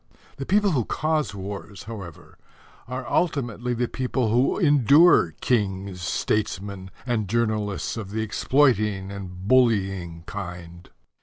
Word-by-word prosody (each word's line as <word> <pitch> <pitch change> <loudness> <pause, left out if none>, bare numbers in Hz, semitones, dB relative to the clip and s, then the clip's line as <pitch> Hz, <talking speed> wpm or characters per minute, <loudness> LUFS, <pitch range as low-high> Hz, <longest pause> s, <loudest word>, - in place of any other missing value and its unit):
The 135 - -5
people 205 0 +3
who 130 -7 +1
cause 155 -2 -1
wars, 100 0 -7
however, 100 -8 -10 0.5
are 125 +1 -5
ultimately 125 -7 -1
the 120 +1 0
people 125 -3 -1
who 125 +4 +2
endure 145 - +5
kings, 100 -5 -1
statesmen 100 0 -2 0.2
and 115 -5 -1
journalists 110 -3 -1
of 105 -4 -5
the 110 +2 -2
exploiting 105 -5 +1
and 95 -1 -8
bullying 95 -9 +2
kind. 85 -3 -8
105 Hz, 120 wpm, -24 LUFS, 95-125 Hz, 0.5 s, endure